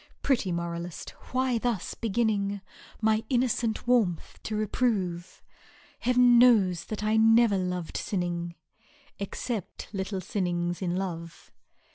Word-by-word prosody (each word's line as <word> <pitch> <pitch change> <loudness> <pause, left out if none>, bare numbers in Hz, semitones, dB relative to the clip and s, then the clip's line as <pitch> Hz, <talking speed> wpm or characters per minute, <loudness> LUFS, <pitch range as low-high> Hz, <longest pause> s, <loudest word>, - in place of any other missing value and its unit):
"— - - -42
Pretty 240 -9 +1
moralist! 170 0 -4 0.2
why 255 -2 +1
thus 230 -5 -2
beginning 205 -3 0 0.4
My 220 0 +2
innocent 240 -3 0
warmth 225 -9 +1
to 215 - -4
reprove? 200 -5 -1 0.6
Hedv'n 245 -1 +5
knows 205 -8 +5
that 215 -1 -5
I 215 +1 +2
never 225 -1 +5
lov'd 180 -2 -3
sinning"^ 175 -3 -2 0.6
Except 200 +1 -5
little 190 0 -3
sinnings 175 -2 -2
in 175 -2 -1
love 170 -3 -5
200 Hz, 115 wpm, -28 LUFS, 175-230 Hz, 0.6 s, Hedv'n